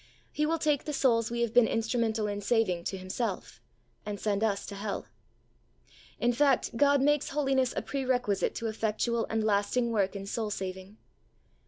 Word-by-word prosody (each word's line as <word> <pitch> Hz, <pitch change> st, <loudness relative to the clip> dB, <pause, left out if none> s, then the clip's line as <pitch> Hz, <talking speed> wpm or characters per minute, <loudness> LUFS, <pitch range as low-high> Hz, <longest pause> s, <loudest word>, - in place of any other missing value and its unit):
He 300 Hz, 0 st, 0 dB
will 330 Hz, +1 st, +1 dB
take 300 Hz, -3 st, +1 dB
the 300 Hz, -, -3 dB
souls 230 Hz, -5 st, +2 dB
we 235 Hz, 0 st, -2 dB
have 235 Hz, -2 st, 0 dB
been 240 Hz, -2 st, +6 dB
instrumental 225 Hz, -1 st, 0 dB
in 205 Hz, 0 st, -3 dB
saving 200 Hz, -5 st, +1 dB
to 195 Hz, -, -3 dB
Himself 185 Hz, -, -4 dB, 0.4 s
and 205 Hz, -1 st, -5 dB
send 210 Hz, 0 st, 0 dB
us 205 Hz, -3 st, 0 dB
to -, -, -7 dB
hell. 200 Hz, 0 st, -4 dB, 1.1 s
In 240 Hz, +1 st, +2 dB
fact, 275 Hz, -2 st, +2 dB
God 280 Hz, +2 st, +4 dB
makes 295 Hz, 0 st, +2 dB
holiness 270 Hz, -3 st, +1 dB
a -, -, -1 dB
pre 275 Hz, -1 st, -3 dB
requisite 245 Hz, -6 st, 0 dB
to 230 Hz, -, -4 dB
effectual 225 Hz, +1 st, -1 dB
and 220 Hz, 0 st, 0 dB
lasting 215 Hz, +3 st, +1 dB
work 200 Hz, -3 st, 0 dB
in 195 Hz, 0 st, -5 dB
soul 215 Hz, +2 st, -2 dB
saving. 190 Hz, +1 st, -6 dB
225 Hz, 175 wpm, -29 LUFS, 205-255 Hz, 1.1 s, been